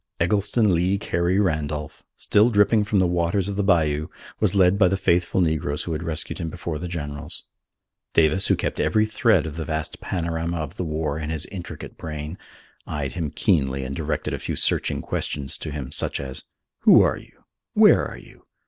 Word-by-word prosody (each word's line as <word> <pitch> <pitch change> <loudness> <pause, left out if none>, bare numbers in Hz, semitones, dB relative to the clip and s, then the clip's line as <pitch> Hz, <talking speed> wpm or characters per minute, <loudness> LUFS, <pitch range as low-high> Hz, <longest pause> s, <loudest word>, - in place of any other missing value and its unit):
Eggleston 105 +3 +2
Lee 90 +3 +2
Carey 90 -2 0
Randolph, 75 -3 -2 0.2
still 105 +3 +3
dripping 105 0 +4
from 105 -1 0
the 95 - +4
waters 90 +2 0
of 100 - -3
the 100 - 0
bayou, 80 -5 +2 0.3
was 100 -2 +1
led 95 0 +4
by 95 - +6
the 95 +2 +1
faithful 90 0 +2
negroes 80 -3 0
who 85 - -5
had 80 0 -2
rescued 80 0 -3
him 85 -2 -3
before 85 -2 -5
the 90 - -4
generals. 75 -1 -5 0.7
Davis, 80 +4 +4
who - - +4
kept - - -3
every 110 0 +3
thread 110 - +2
of 80 0 -6
the 80 - -2
vast 80 0 -4
panorama 85 -1 -2
of 75 -3 -5
the - - -2
war 75 -2 -2
in 75 -1 -4
his 80 -1 -3
intricate 90 -3 -8
brain, 75 +2 -6 0.5
eyed 75 -3 -3
him 80 -4 -2
keenly 70 -4 +1
and 65 +1 -5
directed 80 0 -2
a - - -3
few - - -3
searching - - +1
questions 70 -2 -3
to - - -5
him, 70 -3 -5
such - - -1
as: 65 -1 -6 0.3
"Who - - +7
are - - +1
you? - - -17 0.3
Where - - +6
are - - -9
you? - - -17
85 Hz, 195 wpm, -24 LUFS, 75-95 Hz, 0.7 s, Who